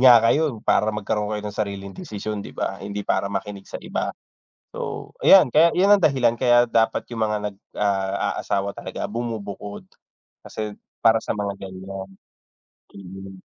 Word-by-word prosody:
nga 125 -2 +9
kayo 145 +2 +3
para 105 - +3
magkaroon 105 0 -1
kayo 105 - -5
ng 105 - -4
sariling 100 -1 -4
desisyon, 105 +2 -5
'di - - -10
ba? 95 - -3
Hindi 100 +1 -5
para 100 - 0
makinig 100 0 -5
sa - - -5
iba. - - -2 0.7
So, - - -5
ayan, 180 -11 +7
kaya 160 +3 +7
yun 185 - +5
ang 205 - +4
dahilan. 130 -7 +3
Kaya 120 0 +4
dapat 115 -1 +1
yung 115 - -4
mga 105 0 0
nag 100 - -17 0.2
ah, 100 -1 0
aasawa 100 0 -1
talaga, - - -5
bumubukod. 105 -3 -5 0.6
Kasi 105 -1 -5
yun, - - -18 0.3
para 115 0 +6
sa - - -3
mga 100 -1 -2
ganiyan. 95 +1 -8 0.9
Hmm. 95 0 -10
105 Hz, 165 wpm, -23 LUFS, 100-115 Hz, 0.9 s, nga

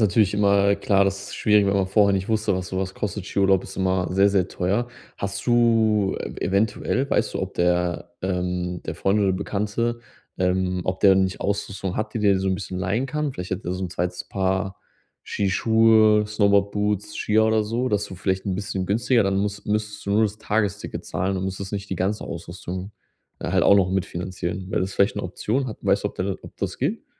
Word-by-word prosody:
natürlich 100 +1 +2
immer 100 -1 +4
klar 100 -1 +3
das 100 0 -2
ist - - -7
schwierig, 105 -2 +4
wenn 100 - +2
man 95 -1 +1
vorher 100 0 +4
nicht 95 +2 -1
wusste, 110 -3 +1
was 90 -1 -3
sowas 95 0 -3
kostet. 100 -2 -4
Skiurlaub 95 -1 +2
ist 95 - -10
immer 95 -1 +1
sehr 100 +2 +4
sehr 95 -2 +1
teuer. 100 +7 -1 0.3
Hast 100 +2 -4
du 115 -4 +3
e - - -6
eventuell 110 +7 0
weißt - - 0
du, - - -1
ob - - -5
der, 90 0 0
ähm 90 -1 -2
der - - -4
Freund 100 +2 +1
oder 95 -2 +3
Bekannte, 105 +5 -2 0.4
ähm 90 0 +1
ob 95 0 -2
der 95 -1 +7
nicht 95 0 0
Ausrüstung 100 -2 -2
hat, 110 - -3
die - - -1
der 100 -2 +4
dir 95 - 0
so 95 - 0
'n 95 - +1
bisschen 95 -1 -5
leihen 100 +8 0
kann? 150 0 -2
Vielleicht 90 -3 -7
hat 95 - -4
er 90 - -2
so 95 +1 -3
'n 90 - -5
2. 90 0 -3
Paar 95 0 -1 0.4
Skischuhe, 110 +1 +3
Snowboard-Boots, 105 0 +1
Skier 110 +1 +2
oder 110 -1 +3
so, 120 +4 -1
dass 105 -1 0
du 95 - -9
vielleicht 95 +1 -1
'n 95 - 0
bisschen 100 -2 -3
günstiger, 115 +3 +2
dann 95 -1 0
muss 100 0 -2
müsstest 105 0 -2
du - - -1
nur 110 - +4
das 105 -1 -1
Tagesticket 105 -2 -2
zahlen 95 +1 -2
und 95 - -2
musst 95 0 -4
jetzt 100 +1 -6
nicht 100 0 -4
die 95 - -2
ganze 100 +4 -1
Ausrüstung 90 +3 -6 0.5
halt - - +1
auch 100 - +6
noch 95 -2 +3
mitfinanzieren. 95 0 -3
Wäre - - 0
das 95 +1 -2
vielleicht 100 +1 +2
'ne - - -2
Option? 110 +8 -2
Hat 110 - -6
weißt - - +1
du, - - +2
ob - - -15
der 95 +1 -2
ob - - -13
das - - -4
geht? - - -2
100 Hz, 215 wpm, -23 LUFS, 95-105 Hz, 0.5 s, der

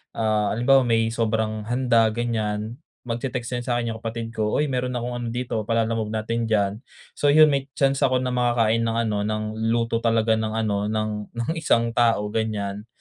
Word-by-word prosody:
ah, 110 -2 +1
halimbawa 130 +2 +4
may 115 -1 +2
sobrang 110 -2 -1
handa 120 -2 +3
ganyan, 110 0 -2 0.3
magte-text 120 0 -3
yan - - -8
sa'kin 120 -1 0
yung 110 - -8
kapatid 115 0 -5
ko, 105 -2 0
"uy, 150 - +2
mayro'n 125 0 -1
akong 120 +1 -3
ano 120 - -4
dito 120 -2 -2
pa-Lalamove 115 -1 0
natin 115 +1 -2
diyan." 100 -1 +1 0.4
So 145 - +2
'yun 155 +1 +7
may 140 -1 -1
chance 135 -1 +2
ako 130 -1 +2
na 125 - -1
makakain 120 -2 +2
ng 115 0 -1
ano 105 -1 -1
ng 110 0 -2 0.3
luto 115 0 0
talaga 115 -1 +2
ng 110 -1 -2
ano 105 -2 0
ng, 110 0 -3
ng 120 +2 -3
isang 115 -7 +2
tao 115 -3 +2
ganyan. 105 -1 -3
115 Hz, 180 wpm, -24 LUFS, 110-120 Hz, 0.4 s, yun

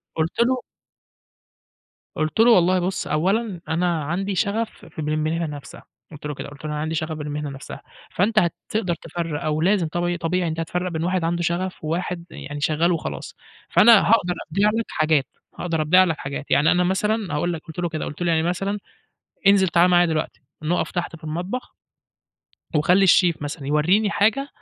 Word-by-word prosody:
قلت 160 +5 -2
له 255 +1 +2 1.5
قُلت 155 +5 -2
له: 235 +2 +7
"والله 185 -3 +4
بُص 185 +2 -2
أولًا 190 +4 0
أنا 170 -1 0
عندي 190 +6 -2
شغَف 220 +4 -2
ف - - -8
بالمهنة 155 +2 -1
نفْسها." 145 -2 -9 0.3
قُلت 150 -1 -11
له 150 - -3
كده، 140 - -7
قُلت 145 +1 -12
له: 155 - -3
"أنا 150 - -3
عندي 160 +1 -2
شغَف 160 0 -2
بالمهنة 150 -1 -4
نفْسها"، 135 0 -9 0.3
فأنتَ 215 +4 +2
هتقدَر 180 +1 -1
تفرِّق، 165 -2 -5
أو 155 0 0
لازم 185 -1 +2
طب 175 +2 -1
طبيعي 175 +1 0
أنتَ 160 0 -3
هتفرِّق 180 +2 -2
بين 160 -1 -2
واحد 180 0 0
عنده 170 +1 0
شغَف 175 +2 -2
وواحد 170 +2 -3
يعني 145 0 -7
شغَّال 160 +3 +2
وخلاص. 165 -3 -4 0.3
فأنا 225 -1 +7
هاقدَر 200 -6 +3 0.2
أبيع 200 +5 +3
لك 225 +1 -1
حاجات، 155 -3 +2 0.3
هاقدَر 165 -3 -1
أبيع 180 +5 +5
لك 165 -4 -1
حاجات، 140 0 -6
يعني 145 +3 +4
أنا 180 0 +3
مثلًا 205 +3 0
هاقول 175 +4 0
لك، 160 - -6
قُلت 160 +1 -8
له 175 -1 -1
كده، 155 -1 -4
قُلت 150 - -8
له 175 -1 +2
يعني 160 -1 +2
مثلًا: 195 +4 -1 0.7
"انزِل 195 -1 +5
تعالَ 175 +1 +4
معايا 175 0 +5
دلوقتي 160 -2 -2 0.2
نقِف 165 +3 -1
تحت 175 -1 -3
في 165 - -17
المطبخ." 175 +10 -4 1.0
وخلِّ 180 +6 +4
الشيف 175 -3 +4
مثلًا 145 -1 -5
يوريني 175 +9 +3
حاجة 220 +8 +1
170 Hz, 180 wpm, -23 LUFS, 155-185 Hz, 1.5 s, له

